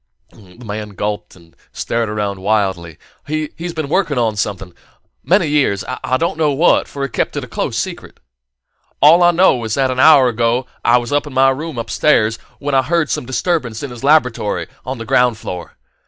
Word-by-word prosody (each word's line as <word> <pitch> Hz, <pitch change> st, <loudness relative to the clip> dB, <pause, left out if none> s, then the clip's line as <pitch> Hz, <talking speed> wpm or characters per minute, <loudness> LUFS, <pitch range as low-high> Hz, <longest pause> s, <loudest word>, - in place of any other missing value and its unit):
The 95 Hz, -2 st, -18 dB
man 105 Hz, -1 st, -6 dB
gulped 105 Hz, +1 st, -4 dB
and 85 Hz, -2 st, -21 dB, 0.2 s
stared 115 Hz, -2 st, -2 dB
around 105 Hz, -2 st, -3 dB
wildly. 95 Hz, -5 st, -1 dB, 0.3 s
"He's 155 Hz, +3 st, -4 dB
been 155 Hz, -3 st, -3 dB
working 160 Hz, -3 st, 0 dB
on 115 Hz, -3 st, +1 dB
something 95 Hz, -3 st, -4 dB, 0.5 s
many 185 Hz, 0 st, +3 dB
years 145 Hz, -10 st, +1 dB, 0.2 s
I 130 Hz, -, +1 dB
don't 165 Hz, +2 st, -2 dB
know 150 Hz, -2 st, +2 dB
what, 160 Hz, +6 st, +3 dB
for 140 Hz, -, -6 dB
he 140 Hz, -, -2 dB
kept -, -, -2 dB
it -, -, -3 dB
a -, -, -8 dB
close -, -, -3 dB
secret. -, -, -5 dB, 0.8 s
All 165 Hz, +4 st, +6 dB
I 175 Hz, -, +6 dB
knew 175 Hz, -8 st, +3 dB
is 110 Hz, -1 st, -2 dB
that 135 Hz, -1 st, +1 dB
an 130 Hz, -, -3 dB
hour 140 Hz, -3 st, +7 dB
ago 120 Hz, +1 st, 0 dB, 0.2 s
I 120 Hz, +1 st, +5 dB
was 120 Hz, -1 st, -4 dB
in 145 Hz, 0 st, +2 dB
my 135 Hz, +1 st, +4 dB
room 150 Hz, +1 st, -5 dB
upstairs, 115 Hz, -1 st, +1 dB, 0.2 s
when 145 Hz, 0 st, -4 dB
I 135 Hz, -, +4 dB
heard 160 Hz, +3 st, 0 dB
some 120 Hz, -, -3 dB
disturbance 130 Hz, -3 st, -2 dB
in 140 Hz, -, -5 dB
his 120 Hz, +1 st, -10 dB
laboratory, 125 Hz, -, +2 dB, 0.2 s
on 130 Hz, 0 st, -3 dB
the 115 Hz, -, -7 dB
ground 125 Hz, -2 st, +2 dB
floor. 90 Hz, -4 st, -8 dB
125 Hz, 190 wpm, -17 LUFS, 105-150 Hz, 0.8 s, hour